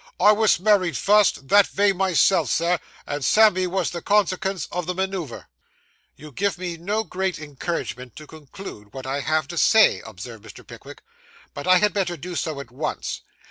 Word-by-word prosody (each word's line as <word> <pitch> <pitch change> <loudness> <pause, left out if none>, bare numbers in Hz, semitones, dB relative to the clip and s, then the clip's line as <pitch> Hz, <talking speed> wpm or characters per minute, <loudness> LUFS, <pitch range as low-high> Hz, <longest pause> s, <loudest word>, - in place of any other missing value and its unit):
I 205 +3 +6
wos 215 -3 +3
married 190 -3 +2
fust, 205 -9 +3
that 205 -1 +6
vay 200 0 +2
myself, 185 -5 +2
Sir, 170 +5 +1 0.3
and 145 -1 -4
Sammy 185 - +4
wos 185 0 -1
the 170 - -6
consekens 195 -3 0
o' 180 - -2
the 180 +1 -4
manoover.' 190 -8 -4 0.7
'You 150 0 -12
give 195 +6 -1
me 175 -1 -5
no 205 +7 -2
great 190 -2 -3
encouragement 145 -4 -5
to 155 - -10
conclude 145 - -12
what 130 -1 -7
I 135 +2 -2
have 155 0 0
to 170 - -3
say,' 220 -1 +5
observed 110 +1 -10
Mr. 110 -3 -13
Pickwick, - - -13 0.5
'but 145 - -7
I 185 0 +6
had 210 +3 +2
better 180 -4 -1
do 175 +4 -7
so 155 -3 -3
at 130 -4 -10
once. 150 +5 -4
175 Hz, 180 wpm, -23 LUFS, 145-195 Hz, 0.7 s, I